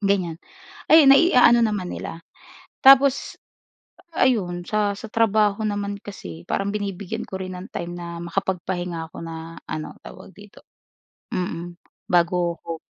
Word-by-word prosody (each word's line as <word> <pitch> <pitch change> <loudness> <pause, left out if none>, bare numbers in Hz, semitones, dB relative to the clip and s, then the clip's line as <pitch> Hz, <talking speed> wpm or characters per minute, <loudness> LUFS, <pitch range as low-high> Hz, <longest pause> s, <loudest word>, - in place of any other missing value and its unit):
ganyan, 185 -5 0 0.5
ayun, 315 -3 +8
nai-aano 250 -6 +6
naman 205 -5 -1
nila. 165 - -7 0.6
Tapos 275 0 +5 0.8
ayun 185 - +1
sa 210 -1 +1
sa - - -8
trabaho 215 -2 +2
naman 205 -1 -2
kasi 85 - -9
parang 200 0 -1
binibigyan 205 +2 -4
ko 190 - -6
rin 185 0 -6
ng 180 +1 -9
time 175 0 -5
na 170 -1 -7
makapag-pahinga 175 -2 -3
ako - - -9
na 165 0 -8
ano, 155 - -5
tawag - - -12
dito? - - -16 0.7
Mm, 175 -1 -4 0.3
bago 175 -1 +2
ko 165 -1 -6
190 Hz, 130 wpm, -23 LUFS, 170-215 Hz, 0.8 s, ayun